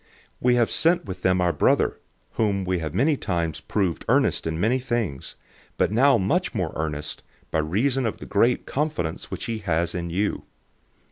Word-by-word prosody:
008:022 - - -34 0.3
We 125 0 +4
have 120 -2 +2
sent 170 +2 +3
with 95 -2 -7
them 95 0 +2
our 90 -1 +2
brother, 75 - +2 0.3
whom 100 -4 0
we 90 -1 0
have 80 0 -5
many 145 +9 +3
times 85 - -2
proved 95 -3 -1
earnest - - +2
in 80 0 -2
many 115 +7 +2
things, 120 - -3 0.4
but - - +2
now 130 +4 +5
much 95 -3 0
more - - -1
earnest, 75 -1 -3 0.3
by 80 - +1
reason 120 - +1
of 110 - -3
the - - -9
great 115 +5 +2
confidence 145 - -2
which - - -5
he 115 -1 -3
has 85 -4 0
in 85 -1 -3
you. 100 +5 -1
95 Hz, 185 wpm, -24 LUFS, 85-120 Hz, 0.4 s, now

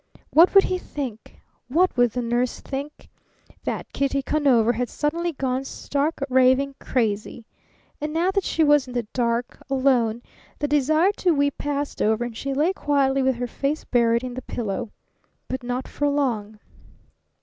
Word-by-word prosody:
What 340 +5 +6
would 390 - +9
he 370 -1 -1
think? 255 -10 -7 0.3
What 345 +8 +2
would 245 -2 +3
the 245 - -2
nurse 240 +1 -1
think? 280 +2 -7 0.6
That - - -4
Kitty 275 0 0
Conover 255 -6 +3
had 245 0 -2
suddenly 335 +3 -1
gone 265 -3 -2
stark, 285 +2 -2
raving 260 +1 +3
crazy! 220 -2 -2 0.6
And 300 0 -2
now 340 +4 +1
that 395 0 0
she 325 - +1
was 295 -3 +4
in 250 - -8
the 240 -2 -1
dark, 235 -1 -1
alone, 250 -4 +2 0.3
the 290 - -1
desire 310 +6 +3
to 350 -3 +2
weep 285 -1 0
passed 290 0 -3
over 220 +2 +2
and 240 -2 -7
she 275 +4 -4
lay 305 +7 +1
quietly 275 -5 +1
with 265 -1 +2
her 245 +1 -3
face 280 +5 -2
buried 235 -1 +2
in 250 -1 -5
the 255 - -5
pillow. 215 -4 -4 0.6
But 260 0 -4
not 250 +1 -3
for 290 0 -1
long. 230 -7 -1
270 Hz, 165 wpm, -24 LUFS, 245-290 Hz, 0.6 s, would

